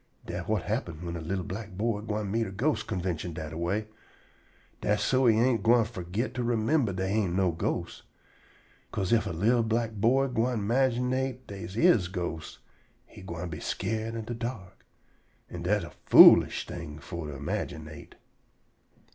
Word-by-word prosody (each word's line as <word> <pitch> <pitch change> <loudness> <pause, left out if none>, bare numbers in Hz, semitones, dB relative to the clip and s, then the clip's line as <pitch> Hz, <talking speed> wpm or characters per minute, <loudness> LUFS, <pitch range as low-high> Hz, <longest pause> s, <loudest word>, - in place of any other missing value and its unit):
Dat - - -5
whut 105 -3 0
happen 105 -5 -2
whin 85 0 -4
a 85 - -5
li'l 90 +3 -2
black 95 +2 -6
boy 105 +2 -1
gwine 105 -2 -3
meet 115 +1 0
a - - -7
ghost 135 +10 -1
convintion 90 -5 -3
dat 80 -1 -6
a - - -6
way. 100 +6 -1 1.0
Dat's - - +1
so 130 -1 +3
he 110 -2 +5
ain't 120 0 +3
gwine 115 0 +4
fergit 100 +2 -4
to 125 - -2
remimber 120 +1 +1
dey 95 0 -2
ain't 100 -5 0
no 95 -2 +2
ghosts. 80 - -3 0.9
'Ca'se 95 +2 -1
ef 115 - +2
a - - -2
li'l 110 +9 +2
black 115 0 0
boy 115 +6 +2
gwine 125 -1 0
imaginate 130 +2 0
dey 100 -3 -7
is 110 - +3
ghostes, 85 -4 -5 0.5
he - - -14
gwine 85 -1 -6
be 75 - -6
skeered 110 +3 -3
in 115 -1 -5
de 120 - -4
dark. 115 -5 -6 0.7
An' 90 - -6
dat 100 +3 +1
a 85 - -8 0.2
foolish - - +8
thing 80 -3 -7
for 85 0 -7
to 75 - -6
imaginate. 75 0 -5
105 Hz, 170 wpm, -28 LUFS, 90-115 Hz, 1.0 s, foolish